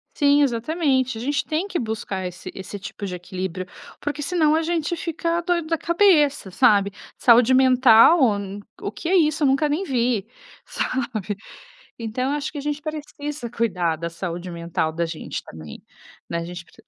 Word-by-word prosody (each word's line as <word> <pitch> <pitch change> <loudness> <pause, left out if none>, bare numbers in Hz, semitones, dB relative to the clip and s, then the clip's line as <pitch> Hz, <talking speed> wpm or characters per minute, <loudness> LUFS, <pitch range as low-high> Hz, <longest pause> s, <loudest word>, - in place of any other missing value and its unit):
Sim, 285 0 +4
exatamente. 260 0 0
A 225 - -6
gente 285 +3 0
tem 320 +5 -2
que 370 -3 -2
buscar 220 -4 -3
esse 180 -1 -8
esse 190 +2 -7
tipo 205 +1 -9
de 185 -2 -3
equilíbrio, 185 0 -5 0.3
porque 295 +1 -3
se 350 +5 -3
não 310 -3 +4
a 320 - +2
gente 335 0 -1
fica 335 0 -2
doido 340 -2 0
da 330 - +1
cabeça, 315 - +3
sabe? 200 -2 +4 0.3
"Saúde 240 0 +5
mental, 255 +3 +6
hum, 205 -4 +1 0.2
o - - -4
que 270 +11 -5
é 385 - +3
isso? 310 -3 +3
Eu 285 - +4
nunca 275 +3 +3
nem 300 +6 -1
vi." 240 - 0 0.4
Sabe? 220 -6 -3 0.6
Então, 235 +4 -2
acho 295 0 -3
que 300 - -6
a - - -3
gente 295 0 -3
precisa 295 -4 -6
cuidar 180 -9 0
da 170 +1 -4
saúde 175 +1 -5
mental 170 -1 -2
da 170 +2 -1
gente 165 -1 -5
também, 80 -2 -11 0.5
né? 170 - -2
A 170 - -3
gente 175 0 -8
pre - - -24
255 Hz, 180 wpm, -23 LUFS, 195-300 Hz, 0.6 s, mental